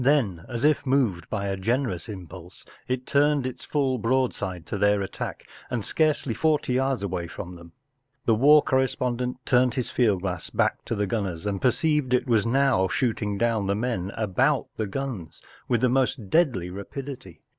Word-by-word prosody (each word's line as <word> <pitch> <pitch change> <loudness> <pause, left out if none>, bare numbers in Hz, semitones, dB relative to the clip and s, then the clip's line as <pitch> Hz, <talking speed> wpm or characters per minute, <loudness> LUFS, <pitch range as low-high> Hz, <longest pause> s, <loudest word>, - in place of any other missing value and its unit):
Then, 115 - +2
as 120 +2 -2
if 150 -1 +3
moved 125 - +1
by 100 -2 -2
a 100 -1 -1
generous 115 0 -1
impulse, 90 -2 -10 0.2
it 130 0 -2
turned 145 -1 +2
its 130 - -5
full 135 -4 0
broad¬ 130 +3 +1
side 90 -4 -5
to 100 - -4
their 105 0 +3
attack, 95 - -6 0.2
and 120 -5 -2
scarcely 155 -6 +1
forty 150 -2 +1
yards 130 -3 0
away 90 -3 -3
from 90 +1 -8
them. 85 -1 -14 0.5
The 115 - +4
war 145 +7 +6
correspondent 125 -2 0
turn^i 125 -1 +3
his. 125 - -2
field 105 -7 +2
glass 90 -4 -3
back - - 0
to - - -2
the 105 -1 0
Runners 95 -4 -3
and 100 -2 -1
j6o - - -25
THE 125 - +5
STRAND 155 +5 +1
MAGAZINE. 145 -4 0
perceived - - -1
it 125 +1 0
was 115 -3 +3
now 130 -6 +3
shooting 105 -2 -1
down 110 -2 +1
the 100 - +1
men 105 -5 -2
about 125 +7 +1
tine 110 -2 -3
guns 110 - -5 0.3
with 120 -2 +1
the 130 - +4
most 125 -5 0
deadly 125 - +2
rapidity. 110 - -8
115 Hz, 190 wpm, -25 LUFS, 95-130 Hz, 0.5 s, war